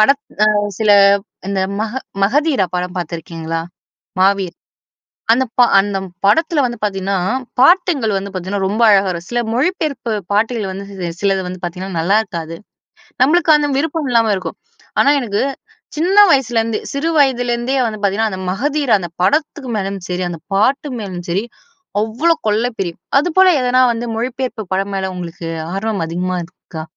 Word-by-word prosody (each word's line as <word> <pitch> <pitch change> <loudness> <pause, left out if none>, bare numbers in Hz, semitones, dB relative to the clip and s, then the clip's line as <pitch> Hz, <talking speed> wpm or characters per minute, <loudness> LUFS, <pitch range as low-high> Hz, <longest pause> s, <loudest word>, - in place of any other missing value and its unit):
படத் 275 +6 +4 0.2
அ - - +4 0.3
சில 215 - +3 0.6
இந்த 195 -1 -1 0.2
மக 220 - -4 0.3
'மகதீரா' 260 - +1
படம் 180 0 -3
பாத்துருக்கீங்களா? 165 -1 -4 0.6
'மாவீர்'. 190 -2 +2 0.8
அந்த 260 +3 +3
ப - - +8 0.2
அந்த 195 0 -2 0.3
படத்துல 310 - +3
வந்து 240 -1 -2
பாத்தீங்கன்னா, 195 -1 -1 0.4
பாடல்கள் 300 - +4
வந்து 195 +1 -4
பாத்தீங்கன்னா, 190 +2 -3
ரொம்ப 215 +4 -1
அழகா 200 -2 +5
வரும். 170 -1 -4
சில 240 0 0
மொழிபெயர்ப்பு 275 -3 -1 0.2
பாடல்கள் 215 -1 0
வந்து 195 +1 -6
சி 185 -3 -5
சிலது 195 -1 +1
வந்து 180 0 -7
பாத்தீங்கன்னா 180 0 -4
நல்லாருக்காது. 170 -3 0 0.7
நம்மளுக்கு 320 +3 +4
அந்த 295 -1 +2
விருப்பம் 305 -1 -1
இல்லாம 230 -2 +3
இருக்கும். 185 -3 -6 0.4
ஆனா, 280 - +5
எனக்கு, 215 -5 -1 0.5
சின்ன 365 +5 +1
வயசுலேருந்து 230 -5 +1
சிறு 285 +4 -1
வயதிலேருந்தே 245 -1 +1
வந்து 215 -2 -6
பாத்தீங்கன்னா, 210 +2 +1
அந்த 190 0 -5
'மகதீரா' 275 +2 +1
அந்த 175 -2 -5
படத்துக்கு 290 - 0
மேலயும் 195 -1 -3
சரி, 180 +1 -2
அந்த 170 -2 -6 0.2
பாட்டு 270 +8 +2
மேலும் 180 -4 -6
சரி, 195 +6 0 0.6
அவ்ளோ 265 +11 +1
கொள்ள 215 +3 +2
பிரியம். 175 -3 -4 0.2
அதுபோல 370 +5 +4
எதனா 250 +1 +3
வந்து 235 +1 -4
மொழிப்பெயர்ப்பு 245 -2 -3
படம் 195 +1 -1
மேல, 190 -1 -2
உங்களுக்கு 170 -2 -6 0.3
ஆர்வம் 200 -2 -2
அதிகமா 180 +2 -2
இருக்கா? 165 -2 -10
210 Hz, 145 wpm, -17 LUFS, 190-260 Hz, 0.8 s, ப